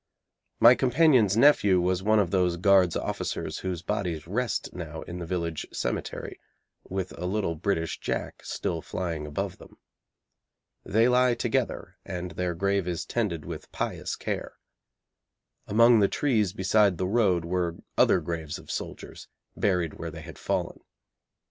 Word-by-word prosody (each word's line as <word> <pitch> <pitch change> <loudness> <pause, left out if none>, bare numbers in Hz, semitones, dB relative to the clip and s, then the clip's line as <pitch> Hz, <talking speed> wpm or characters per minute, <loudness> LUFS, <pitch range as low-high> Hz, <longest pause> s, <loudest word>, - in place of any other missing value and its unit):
My 120 - +9
companion's 125 - +4
nephew 110 -8 +5
was 90 +1 +1
one 110 +2 +3
of 95 -5 +2
those 90 -3 +2
Guards' 95 -1 +4
officers - - -3
whose 90 -2 -4
bodies 90 -7 -2
rest 115 +7 -2
now 80 -3 -6
in 90 +1 -7
the 85 - -6
village 85 -3 -3
cemetery, - - -4 0.5
with 95 -1 -3
a 90 - -2
little 95 -3 -1
British 80 0 -2
Jack - - -4
still 80 - -3
flying 85 -5 -4
above 75 - -4
them. - - -15 1.1
They 115 +4 +3
lie 125 0 +4
together, - - -2
and 90 -2 -5
their 90 0 -2
grave 100 +1 0
is 85 -2 -2
tended 95 -10 -2
with - - -8
pious - - -3
care. - - -4 1.1
Among 115 +2 +6
the 100 - +5
trees 110 -9 +1
beside 100 0 +2
the 95 - -1
road 95 -5 +2
were 85 -1 -1 0.2
other - - +4
graves 80 -3 -4
of - - -10
soldiers, - - -7 0.3
buried 90 -5 0
where 85 - -4
they 80 0 -9
had 80 0 -11
fallen. - - -2
95 Hz, 150 wpm, -27 LUFS, 85-105 Hz, 1.1 s, My